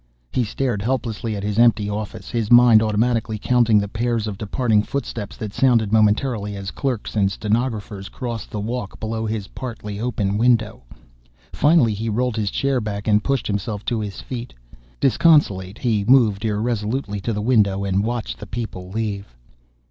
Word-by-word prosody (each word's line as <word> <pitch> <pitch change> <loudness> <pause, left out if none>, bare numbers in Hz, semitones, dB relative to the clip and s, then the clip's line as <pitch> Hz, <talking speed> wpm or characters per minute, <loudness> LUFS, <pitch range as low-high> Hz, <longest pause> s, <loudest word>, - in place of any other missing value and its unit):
He 125 - +1
stared 115 -1 -2
helplessly 115 -2 -2
at 100 - -5
his 105 +1 -1
empty 115 -3 +4
office, 105 -1 -5
his 115 -2 -2
mind 120 -2 +8
automatically 110 0 0
counting 115 -1 +3
the 100 0 +1
pairs 115 +1 -1
of 105 -2 -4
departing 110 +1 +1
footsteps 115 -4 -5
that 105 -2 -6
sounded 115 -5 +2
momentarily 105 -1 +2
as 100 -1 -5
clerks 130 -7 -3
and 100 -2 +2
stenographers 105 -2 -2
crossed 120 -3 -5
the 105 - -4
walk 115 0 -4
below 110 0 -3
his 105 -2 -4
partly 110 -5 -6
open 105 -4 -1
window. 115 -2 +2 0.7
Finally 145 -7 +4
he 110 +3 -3
rolled 120 +2 0
his 105 -3 -1
chair 135 +2 0
back 105 -1 -5
and 105 -1 +3
pushed 135 -3 0
himself 105 0 -3
to 120 - -1
his 105 -2 -5
feet. 120 - -7 0.4
Disconsolate, 115 - +3
he 110 -5 0
moved 115 -5 +4
irresolutely 105 0 -1
to 105 +4 -3
the 105 - -2
window 105 -5 +2
and 100 +1 +1
watched 120 0 -3
the - - -8
people 100 -6 -6
leave. 100 - -4
110 Hz, 165 wpm, -21 LUFS, 105-120 Hz, 0.7 s, mind